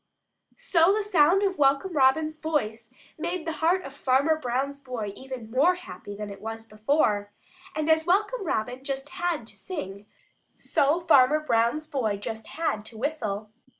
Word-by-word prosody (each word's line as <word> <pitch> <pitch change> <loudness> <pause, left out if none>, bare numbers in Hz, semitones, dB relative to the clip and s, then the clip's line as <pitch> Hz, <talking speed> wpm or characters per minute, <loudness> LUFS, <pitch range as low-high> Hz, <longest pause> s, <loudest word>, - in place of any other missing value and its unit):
So 335 0 +3
the 430 - 0
sound 370 -1 +4
of 380 -4 0
Welcome 275 +6 +3
Robin's 310 +3 +2
voice 230 -9 -2 0.3
made 350 +1 -3
the 325 - -1
heart 355 +3 +3
of 275 - -8
Farmer 280 +3 +2
Brown's 275 0 -2
boy 235 -7 -5
even 260 -4 -8
more 300 +9 +4
happy 355 - -9
than 210 0 -6
it 200 - -10
was 225 0 -6
before, 215 -2 0 0.4
and 310 0 -1
as 320 0 +4
Welcome 415 +5 +2
Robin 250 - -2
just 275 0 -4
HAD 345 -9 -2
to - - -12
sing, 205 - -7 0.5
so 295 +5 +1
Farmer 300 -3 +5
Brown's 240 +1 +1
boy 255 -9 -1
just 220 +2 -6
HAD 265 -11 -2
to 220 0 -9
whistle. 215 -6 -3
275 Hz, 160 wpm, -26 LUFS, 225-320 Hz, 0.5 s, Farmer